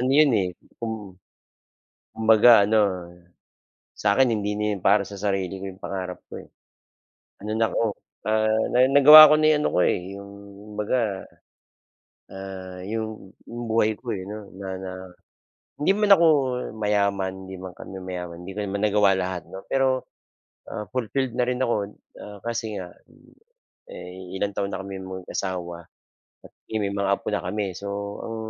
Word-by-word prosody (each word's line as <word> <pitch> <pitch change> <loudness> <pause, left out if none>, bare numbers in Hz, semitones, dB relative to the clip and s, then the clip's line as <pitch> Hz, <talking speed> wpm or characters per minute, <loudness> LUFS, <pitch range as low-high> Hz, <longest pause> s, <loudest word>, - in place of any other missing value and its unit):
Ano 130 +1 +1
'yon, 150 -1 +6
eh, 95 - 0 0.3
kung 115 -1 -2 1.2
kumbaga 110 -1 +6
ano, 110 +1 +3 1.2
sa 100 -1 +2
akin 130 -2 +5
hindi 105 -1 -2
na 105 - -2
'yon - - -10
para 100 +1 +5
sa 100 - -8
sarili 95 -2 -1
ko - - -7
'yong 95 0 -12
pangarap 95 -2 -5
ko, - - -8
eh. - - -18 0.9
Ano 105 - -5
na 115 - +3
ko, 110 -3 0 0.3
ah, 110 0 +2
na 125 - +2
nagawa 150 +2 +10
ko - - +7
na 155 - +4
yung - - +1
ano - - +3
ko - - +4
eh, - - +2 0.2
'yung 100 0 -10 0.5
baga, 105 -2 -1 1.1
ah, 95 -1 -8
'yong 110 -2 -5 0.2
'yong 120 +1 -6
buhay 110 -1 +3
ko 115 -2 -5
eh, 95 - -6
'no 105 0 -8
na 95 -1 -7
na 95 -1 -6 0.9
hindi 150 - +2
man 210 -1 +6
ako 170 -2 +4 0.5
mayaman, 100 -2 0 0.2
'di 95 - -7
man 95 -1 -8
kami 95 - -10
mayaman, 90 -2 -6
'di 95 - -6
ko 105 - -4
naman 100 0 -3
nagawa 105 -1 +4
lahat, 90 -2 -3
'no, 95 - -9
pero, 130 -1 +1 0.7
ah, 105 - -5
fulfilled 130 +1 -2
na 125 - +2
rin 125 0 -2
ako 105 -5 0 0.3
ah, 105 -1 -10
kasi 115 -2 -3
nga, 90 - -8 1.0
eh, 90 0 -8 0.2
ilang 100 +1 -2
taon 100 0 -1
na - - -3
kami 95 0 -7
mag 95 -1 -8
asawa 85 -3 -4
at - - -42 0.8
may 100 - 0
mga 100 0 -1
apo - - -7
na - - -1
kami, 100 0 -3
so 100 - -8 0.4
ang 115 - -5
105 Hz, 170 wpm, -24 LUFS, 95-115 Hz, 1.2 s, nagawa